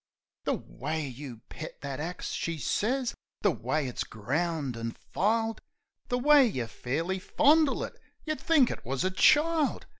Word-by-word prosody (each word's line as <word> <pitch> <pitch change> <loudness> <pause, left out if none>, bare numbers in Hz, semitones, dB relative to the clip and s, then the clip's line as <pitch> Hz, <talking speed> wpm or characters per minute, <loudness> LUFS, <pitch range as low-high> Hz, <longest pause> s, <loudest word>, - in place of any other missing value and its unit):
"The - - +2
way 155 +2 -4
you 125 -3 -8
pet 160 - -8
that 140 -1 -4
axe," 175 +4 -4
she 165 -1 -2
sez 240 - 0 0.3
"the 205 - +4
way 130 +3 -1
it's 125 - -3
ground 140 +4 -2
an' 115 0 -4 0.2
filed, 225 +3 +1 0.5
The 245 - 0
way 285 +1 +6
you 130 - -2
fairly 160 +11 -2
fondle 300 +7 +3
it, - - -8 0.2
you'd 310 -1 -2
think 295 -7 +4
it - - -6
wus 130 +2 -2
a 185 - +1
child 305 - +3
170 Hz, 155 wpm, -29 LUFS, -, 0.5 s, way